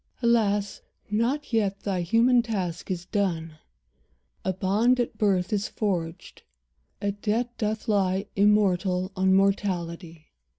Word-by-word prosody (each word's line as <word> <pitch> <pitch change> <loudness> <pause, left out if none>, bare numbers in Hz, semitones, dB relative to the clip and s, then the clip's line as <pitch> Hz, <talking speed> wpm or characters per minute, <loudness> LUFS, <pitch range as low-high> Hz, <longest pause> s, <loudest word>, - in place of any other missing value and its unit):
Alas, 205 -4 +1 0.3
not 245 +6 -1
yet 200 -3 +1
thy 190 -3 -1
human 235 +7 +4
task 190 -8 -4
is 180 -2 -3
done! 170 -6 -2 0.9
A 190 - 0
bond 210 +7 +2
at 240 - -1
birth 190 -3 +1
is 205 0 0
forged; 180 -4 -4 0.6
a 205 - -1
debt 225 +4 -2
doth 215 +2 -2
lie 195 -2 +1
Immortal 195 -2 +2
on 190 0 +3
mortality. 175 -4 -1
200 Hz, 120 wpm, -26 LUFS, 185-215 Hz, 0.9 s, human